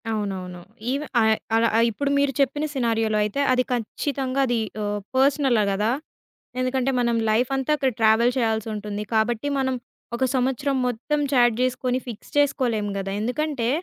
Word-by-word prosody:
అవునవును. 190 Hz, -5 st, -4 dB, 0.3 s
ఈవె 280 Hz, +3 st, -2 dB, 0.2 s
ఆ -, -, +4 dB, 0.3 s
అలా 230 Hz, +1 st, +4 dB, 0.2 s
ఇప్పుడు 280 Hz, +6 st, -2 dB
మీరు 280 Hz, -1 st, +2 dB
చెప్పిన 280 Hz, +2 st, +1 dB
సినారియోలో 225 Hz, -4 st, +1 dB
అయితే 210 Hz, +7 st, -1 dB
అది 255 Hz, 0 st, +3 dB
ఖచ్చితంగా 260 Hz, +3 st, -2 dB
అది 240 Hz, -1 st, +1 dB, 0.2 s
ఆహ్, 205 Hz, 0 st, -2 dB, 0.2 s
పర్సనలా 265 Hz, -4 st, +3 dB
గదా! 210 Hz, +3 st, +1 dB, 0.7 s
ఎందుకంటే 255 Hz, +1 st, 0 dB
మనం 235 Hz, -1 st, +1 dB
లైఫ్ 235 Hz, +3 st, +2 dB
అంతా 270 Hz, +2 st, -1 dB
అక్కడ 265 Hz, -2 st, +1 dB
ట్రావెల్ 225 Hz, +2 st, +4 dB
చేయాల్సుంటుంది. 215 Hz, -3 st, -2 dB
కాబట్టి 225 Hz, +3 st, +1 dB
మనం 260 Hz, -1 st, 0 dB, 0.4 s
ఒక 260 Hz, -, +1 dB
సంవత్సరం 265 Hz, +2 st, 0 dB
మొత్తం 250 Hz, +5 st, -1 dB
చాట్ 240 Hz, -3 st, +4 dB
జేసుకొని 255 Hz, 0 st, 0 dB
ఫిక్స్ 230 Hz, -4 st, -9 dB
చేసుకోలేం 245 Hz, -7 st, +1 dB
గదా! 195 Hz, 0 st, -3 dB
ఎందుకంటే, 250 Hz, +1 st, -1 dB
245 Hz, 145 wpm, -24 LUFS, 220-265 Hz, 0.7 s, ఆ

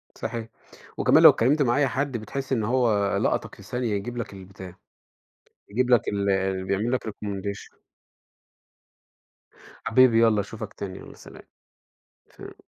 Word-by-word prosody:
صحيح. 115 Hz, -1 st, -5 dB, 0.5 s
وكمان -, -, +4 dB
لو -, -, +12 dB
اتكلمت 140 Hz, +6 st, +2 dB
مع 120 Hz, -2 st, +2 dB
أي 145 Hz, -2 st, +3 dB
حد 130 Hz, -2 st, -2 dB
بتحس 135 Hz, +5 st, -6 dB
إن 115 Hz, -, 0 dB
هو 110 Hz, -4 st, +1 dB
لقطك -, -, -1 dB
في -, -, -15 dB
ثانية، 125 Hz, +3 st, -3 dB
يجيب 120 Hz, +5 st, -4 dB
لك 115 Hz, -, -5 dB
البتاع، 95 Hz, -1 st, -11 dB, 0.9 s
يجيب 125 Hz, +4 st, -1 dB
لك 120 Hz, -, +6 dB
ال 95 Hz, -1 st, -1 dB
يعمل 110 Hz, +5 st, 0 dB
لك 130 Hz, -, -1 dB
recommendation. 100 Hz, -1 st, -6 dB, 2.0 s
حبيبي 115 Hz, -1 st, +5 dB
يالّا 110 Hz, -3 st, +4 dB
أشوفك 105 Hz, +1 st, -8 dB
تاني، 95 Hz, -1 st, -7 dB
يالّا -, -, -12 dB
سلام. -, -, -14 dB, 0.9 s
سلام. -, -, -12 dB
110 Hz, 135 wpm, -25 LUFS, 100-125 Hz, 2.0 s, لو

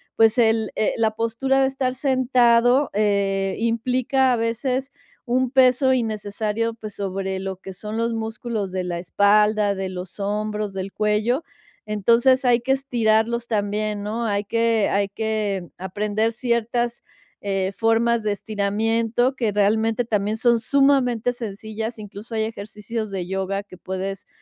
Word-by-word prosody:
pues 225 Hz, +1 st, +4 dB
el 225 Hz, -2 st, +2 dB
eh, 215 Hz, -, +1 dB
la 220 Hz, -1 st, +2 dB
postura 230 Hz, +5 st, 0 dB
de 265 Hz, -, +4 dB
estar 265 Hz, -1 st, -1 dB
sentado, 255 Hz, -1 st, +3 dB
eh, 200 Hz, -2 st, +1 dB
implica, 250 Hz, +3 st, +1 dB
a -, -, +3 dB
veces, 250 Hz, +4 st, -1 dB, 0.4 s
un 255 Hz, +1 st, +1 dB
peso 260 Hz, 0 st, +4 dB
innecesario, 220 Hz, -1 st, -2 dB
pues, 215 Hz, -2 st, -8 dB
sobre 190 Hz, -1 st, -3 dB
lo 190 Hz, 0 st, -4 dB
que 190 Hz, 0 st, -9 dB
son 210 Hz, +3 st, -6 dB
los 230 Hz, 0 st, 0 dB
músculos 220 Hz, -2 st, -4 dB
de 185 Hz, -1 st, -2 dB
la 175 Hz, -1 st, -3 dB
espalda, 205 Hz, +2 st, +3 dB
de 190 Hz, -1 st, -4 dB
los 185 Hz, +1 st, -8 dB
hombros, 210 Hz, 0 st, -2 dB
del 190 Hz, 0 st, -5 dB
cuello. 215 Hz, +7 st, +1 dB, 0.4 s
Entonces, 235 Hz, +5 st, +3 dB
hay 245 Hz, -1 st, +4 dB
que 265 Hz, +3 st, +1 dB
estirarlos 235 Hz, -3 st, +1 dB
también, 210 Hz, -1 st, -1 dB
¿no?, 225 Hz, +3 st, -3 dB
hay 205 Hz, -1 st, 0 dB
que 230 Hz, 0 st, +1 dB
hay 200 Hz, 0 st, +1 dB
que 210 Hz, -3 st, -2 dB
aprender 210 Hz, +4 st, -1 dB
ciertas, 235 Hz, 0 st, -1 dB, 0.4 s
eh, 195 Hz, -1 st, -1 dB
formas 225 Hz, +1 st, +2 dB
de 210 Hz, -, 0 dB
estiramiento 225 Hz, +5 st, 0 dB
que, 230 Hz, -5 st, 0 dB
realmente 220 Hz, +3 st, +1 dB
también 210 Hz, -1 st, -1 dB
son 235 Hz, 0 st, +3 dB
sumamente 250 Hz, -2 st, +2 dB
sencillas, 220 Hz, 0 st, -5 dB
incluso, 210 Hz, +2 st, -9 dB
hay 220 Hz, -, +1 dB
ejercicios 215 Hz, 0 st, -5 dB
de 190 Hz, -2 st, -4 dB
yoga 195 Hz, +1 st, -2 dB
que 190 Hz, -2 st, -14 dB
puedes 190 Hz, +1 st, -5 dB
220 Hz, 145 wpm, -22 LUFS, 205-235 Hz, 0.4 s, pues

